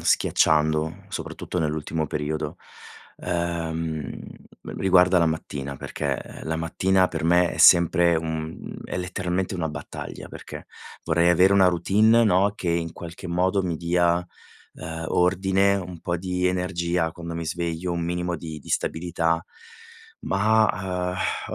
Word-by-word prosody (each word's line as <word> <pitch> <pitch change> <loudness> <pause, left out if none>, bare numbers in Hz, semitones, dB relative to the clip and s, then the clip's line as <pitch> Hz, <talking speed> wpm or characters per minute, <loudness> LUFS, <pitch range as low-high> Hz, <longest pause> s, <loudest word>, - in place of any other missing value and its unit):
schiacciando, 80 0 +2
soprattutto 90 - -5
nell'ultimo 80 0 -1
periodo, 75 +2 -3 0.6
uhm, 80 -3 -3 0.6
riguarda 90 -1 +4
la 85 - +3
mattina 70 -3 -4
perché - - -3 0.2
la 80 0 -2
mattina 95 +3 +2
per 80 -2 -4
me 85 0 +3
è - - -6
sempre 85 0 +6
un 80 0 -5
è - - -4
letteralmente 90 +1 -2
una 85 -3 -2
battaglia, 75 -1 -8
perché - - -10 0.4
vorrei 85 +2 +3
avere 90 +3 +5
una 95 -2 +6
routine, 105 +7 +4
no, 100 0 +3
che 90 - -4
in 85 -1 -1
qualche 85 +1 -9
modo 90 +3 +1
mi 85 -3 -2
dia, 85 0 +2 0.6
uhm, 80 0 -6
ordine, 95 +2 +2
un 90 -3 -6
po' 85 +1 -2
di 90 0 -1
energia 90 -2 0
quando 85 0 -7
mi 85 0 -4
sveglio, 85 +1 -2
un 85 0 -2
minimo 90 0 -2
di 80 -1 -7
di 70 - -15
stabilità. 85 0 0 0.8
Ma, 95 -3 +1 0.4
uhm, - - -3
85 Hz, 135 wpm, -24 LUFS, 80-90 Hz, 0.8 s, sempre